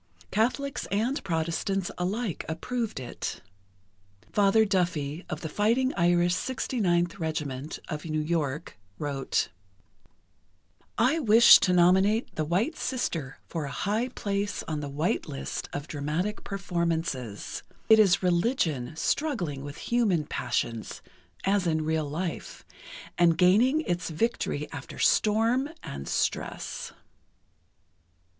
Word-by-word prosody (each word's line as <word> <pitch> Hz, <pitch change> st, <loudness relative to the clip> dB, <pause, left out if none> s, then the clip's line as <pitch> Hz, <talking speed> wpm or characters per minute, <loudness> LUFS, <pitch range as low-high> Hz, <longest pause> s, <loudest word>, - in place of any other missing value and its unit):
Catholics 255 Hz, +6 st, 0 dB
and 230 Hz, +8 st, 0 dB
Protestants 175 Hz, +2 st, -1 dB
alike 195 Hz, +2 st, -2 dB
approved 225 Hz, -, -3 dB
it. 125 Hz, -, -5 dB, 0.9 s
Father 205 Hz, +2 st, +4 dB
Duffy, 175 Hz, -5 st, -1 dB
of 155 Hz, -, -4 dB
the 160 Hz, -, -3 dB
Fighting 230 Hz, -, +1 dB
Irish 175 Hz, 0 st, +3 dB
69th 185 Hz, -6 st, 0 dB
Regiment, 150 Hz, -3 st, -3 dB
of 150 Hz, -2 st, -4 dB
New 155 Hz, -2 st, -2 dB
York, 150 Hz, -4 st, -2 dB, 0.2 s
wrote: 140 Hz, -3 st, -1 dB, 1.5 s
I 330 Hz, -, +3 dB
wish 230 Hz, -4 st, +8 dB
to 185 Hz, -, +2 dB
nominate 190 Hz, +6 st, +4 dB
"The 155 Hz, -, -1 dB
White 200 Hz, -, 0 dB
Sister" 165 Hz, -, -3 dB
for 160 Hz, -3 st, -4 dB
a -, -, -5 dB
high 210 Hz, -, 0 dB
place 205 Hz, -4 st, -2 dB
on 155 Hz, -2 st, -3 dB
the 145 Hz, -1 st, -4 dB
White 145 Hz, +3 st, -1 dB
List 70 Hz, 0 st, -5 dB
of 145 Hz, +1 st, -5 dB
dramatic 155 Hz, +8 st, -2 dB
performances.... 170 Hz, -, -2 dB, 0.3 s
It 220 Hz, 0 st, +7 dB
is 195 Hz, -3 st, +5 dB
religion 170 Hz, -, +1 dB
struggling 175 Hz, -, -1 dB
with 145 Hz, 0 st, -7 dB
human 210 Hz, -10 st, +1 dB
passions, 115 Hz, -5 st, -3 dB, 0.4 s
as 195 Hz, -2 st, +2 dB
in 155 Hz, -1 st, +1 dB
real 155 Hz, -2 st, 0 dB
life, 170 Hz, +3 st, -5 dB, 0.5 s
and 170 Hz, -2 st, +5 dB
gaining 225 Hz, -, +4 dB
its 175 Hz, -, -2 dB
victory 155 Hz, -5 st, -1 dB
after 135 Hz, -, -8 dB
storm 230 Hz, +6 st, +3 dB
and 70 Hz, 0 st, -6 dB
stress. -, -, -2 dB
175 Hz, 115 wpm, -28 LUFS, 155-215 Hz, 1.5 s, wish